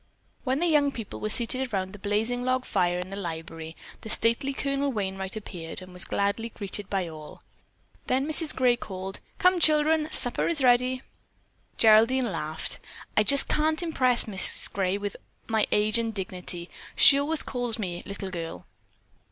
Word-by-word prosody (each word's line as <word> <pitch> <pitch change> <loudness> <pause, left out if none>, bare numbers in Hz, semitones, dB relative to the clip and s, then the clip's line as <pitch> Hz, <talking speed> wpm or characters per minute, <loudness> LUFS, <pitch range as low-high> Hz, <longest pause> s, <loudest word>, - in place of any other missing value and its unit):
When 260 0 0
the 345 - +1
young 295 -4 +3
people 225 -6 -8
were 215 - -3
seated 250 +3 +1
around 190 -1 -3
the 205 - -10
blazing 215 +5 -1
log 255 0 0
in 180 0 0
the - - -5
library, 165 -3 -7 0.3
the 220 - -9
stately 230 +5 +1
Colonel 275 +1 -1
Wainright 190 -3 -4
appeared 175 -7 -7
and 185 -1 -13
was 180 - +1
gladly 200 +3 -1
greeted 200 -2 -6
by 190 -3 -1
all. 155 -2 -11 0.6
Then 265 +2 +1
Mrs. 310 0 +5
Gray 250 -2 +3
called: 190 -3 -7 0.2
"Come, 365 0 +3
children; 310 0 +3
supper 245 - 0
is 315 -5 +1
ready." 255 +1 +3 0.7
Geraldine 230 +2 +4
laughed. 155 -2 -3 0.4
"I - - +5
just 280 +6 +5
can't 310 +2 +1
impress 255 -7 +1
Mrs. 195 -4 +4
Gray 195 0 0
with 205 -1 -5 0.3
my 220 -2 +1
age 215 +2 +2
and 230 -1 -1
dignity. 180 -3 -5 0.2
She 280 - +7
always 305 +2 -1
will - - -8
call 245 -2 -2
me 180 -5 -4
'little 200 -1 -6
girl. 165 -2 -6
220 Hz, 165 wpm, -26 LUFS, 190-260 Hz, 0.7 s, She